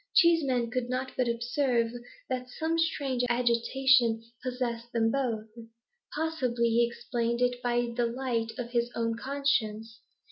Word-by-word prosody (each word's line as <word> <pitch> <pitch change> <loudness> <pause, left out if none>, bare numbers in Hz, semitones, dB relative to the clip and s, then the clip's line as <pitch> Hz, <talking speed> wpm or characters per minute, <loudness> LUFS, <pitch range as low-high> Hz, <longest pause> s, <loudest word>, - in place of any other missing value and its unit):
Cheeseman 275 -9 +4
could 250 -1 -2
not 255 +1 -2
but 255 - +1
observe 235 0 +1 0.4
that 250 -1 -3
some 320 +5 -1
strange 275 -6 0
agitation 240 0 +3 0.2
possessed 240 -2 -3
them 225 -1 +2
both. 235 -5 -1 0.7
Possibly 260 -7 0
he 235 +1 +3
explained 235 0 -2
it 245 0 +1
by 240 -1 0
the 240 -1 +1
light 235 -2 -2
of 240 -2 -5
his 235 -1 +1
own 230 -1 0
conscience. 230 -4 -1
245 Hz, 135 wpm, -29 LUFS, 235-260 Hz, 0.7 s, Cheeseman